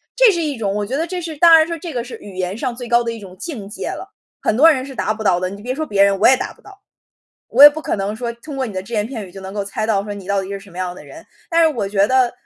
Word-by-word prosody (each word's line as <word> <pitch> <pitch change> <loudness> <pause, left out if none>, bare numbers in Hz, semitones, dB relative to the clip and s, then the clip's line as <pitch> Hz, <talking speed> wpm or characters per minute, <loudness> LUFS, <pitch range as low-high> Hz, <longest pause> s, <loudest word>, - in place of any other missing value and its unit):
这 - - +6
是 345 - -2
一 295 -2 -2
种 210 -5 -2
我 205 0 -1
觉 255 - -3
得 325 +4 -1
这 365 +1 -4
是 330 -2 -6
当 335 0 +8
然 315 - +4
说 335 - -3
这 340 +2 -6
个 240 - -2
是 245 - -9
语 200 -2 -11
言 185 +1 -3
上 245 +1 -3
最 245 0 -7
高 240 +1 +3
的 230 - -2
一 230 - -7
种 190 -3 -12
境 255 - -6
界 205 - -6
了， 390 +2 -7 0.3
很 - - 0
多 305 +7 +7
人 260 -4 -1
是 275 - -9
达 215 - -1
不 220 - -6
到 185 -4 +3
的， 185 0 -2
你 200 +1 -10
别 250 +2 -2
说 310 +4 -3
别 200 -9 +2
人， 200 0 +3
我 210 - +6
也 260 - +5
达 - - -5
不 - - -25
到。 400 -1 -16 0.7
我 280 - +8
也 295 - +13
不 305 +2 -7
可 - - -2
能 200 +2 -2
说 235 +1 -3
通 255 +5 -10
过 265 -1 -1
你 225 - -6
的 185 -1 -4
只 195 +5 -11
言 210 -2 0
片 225 -5 -6
语 - - -15
就 195 +1 -10
能 190 0 -8
够 205 - -2
猜 200 +2 -3
到 215 -3 +1
说 205 - -5
你 200 -2 -9
到 200 0 0
底 190 - -7
是 200 - -4
什 195 0 -15
么 175 - -12
样 180 -1 -3
的 - - -12
人， 330 0 -13 0.2
但 335 0 +3
是 325 - +6
我 215 - -1
觉 200 0 +2
得， 260 +2 +3
呃， - - -10
230 Hz, 380 characters per minute, -19 LUFS, 200-290 Hz, 0.7 s, 也